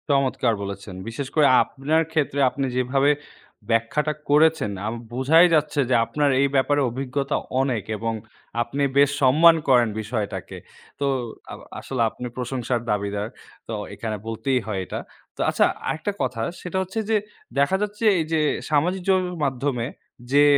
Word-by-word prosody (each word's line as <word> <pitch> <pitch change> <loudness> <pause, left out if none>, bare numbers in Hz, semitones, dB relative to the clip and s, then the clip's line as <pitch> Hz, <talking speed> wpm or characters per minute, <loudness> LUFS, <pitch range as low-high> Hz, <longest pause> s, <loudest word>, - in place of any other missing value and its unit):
চমৎকার 135 -3 +2
বলেছেন। 100 -1 -6
বিশেষ 130 +4 -4
করে 150 -2 +6 0.2
আপনার 150 +4 0
ক্ষেত্রে 150 -3 0
আপনি 135 +1 -2
যেভাবে 135 +3 +3 0.6
ব্যাখ্যাটা 115 +7 +1 0.2
করেছেন। 155 -6 +4
আ - - -1 0.3
বোঝাই 145 +7 +5
যাচ্ছে 150 -1 +1
যে 130 - +4
আপনার 145 +2 +1
এই 140 - +4
ব্যাপারে 145 +2 +3
অভিজ্ঞতা 135 +3 -2 0.3
অনেক 125 -6 0
এবং 115 +1 -2 0.5
আপনি 135 +4 -1
বেশ 140 0 +6
সম্মান 160 +6 +7
করেন 120 -3 +5
বিষয়টাকে। 100 -4 -4 0.4
তো 140 - 0 0.5
আব - - -8 0.2
আসলে 130 -3 -3
আপনি 125 +3 -7
প্রশংসার 125 -1 -2
দাবিদার। 100 0 -1 0.4
তো 115 - -4 0.2
এখানে 110 -2 -4
বলতেই 130 +4 0
হয় 105 -3 -2
এটা। - - -5 0.4
তো - - -5
আচ্ছা - - +3 0.2
আরেকটা 205 +6 -1
কথা 125 -3 -1 0.2
সেটা 180 +1 -4
হচ্ছে 190 +4 -4
যে, 220 - +4 0.4
দেখা 140 +7 +3
যাচ্ছে 210 +1 -3 0.2
এই - - +1
যে 160 - +3 0.3
সামাজিক 170 +6 +1
যোগাযোগের 180 -2 +1
মাধ্যমে 130 -2 -1 0.5
যে 145 +1 +6
135 Hz, 150 wpm, -23 LUFS, 115-150 Hz, 0.6 s, সম্মান